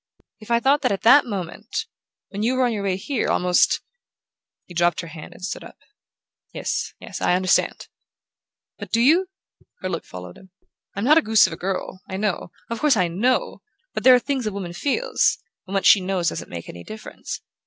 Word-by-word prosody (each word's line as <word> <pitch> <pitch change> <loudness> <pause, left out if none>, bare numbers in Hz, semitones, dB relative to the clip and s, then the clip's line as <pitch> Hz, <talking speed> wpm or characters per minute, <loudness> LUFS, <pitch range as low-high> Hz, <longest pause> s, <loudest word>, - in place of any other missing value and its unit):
If 215 - -14
I 235 0 +3
thought 275 +4 +3
that - - +1
at 195 - -2
that 255 +4 +7
moment... 200 +2 -4 0.4
when 205 0 -5
you 240 +4 +1
were 255 0 +3
on 240 - 0
your 210 - -3
way 195 -2 0
here, 255 +6 -2
almost 180 0 +3 0.4
" - - -64
He 175 - -12
dropped 175 -1 +2
her 165 - -9
hand 155 0 -10
and 185 - -7
stood 205 - -5
up. - - -13 0.7
"Yes, - - -3
yes - - -8
I 180 - +3
understand." 185 0 +1 0.9
"But - - -8
do 230 - +2
you?" 330 +10 +4 0.5
Her 185 - -3
look 170 -3 -3
followed 90 0 -10
him. 190 - -18 0.5
"I'm 200 - -2
not 305 +6 +6
a - - -1
goose 220 -5 +5
of - - -3
a - - -4
girl. 185 0 -4
I 190 - -4
know... 200 -4 -2 0.2
of 230 - -2
course 295 -6 +3
I 180 -3 +2
KNOW...but 255 - -2
there 255 -1 +9
are - - +4
things 265 -3 -2
a - - -1
woman 190 -3 -5
feels... 290 - +1 0.3
when 190 - -6
what 195 - 0
she 200 - +7
knows 185 -2 0
doesn't - - -6
make 85 -1 -7
any 85 - -9
difference. 215 0 -7
200 Hz, 205 wpm, -23 LUFS, 180-250 Hz, 0.9 s, there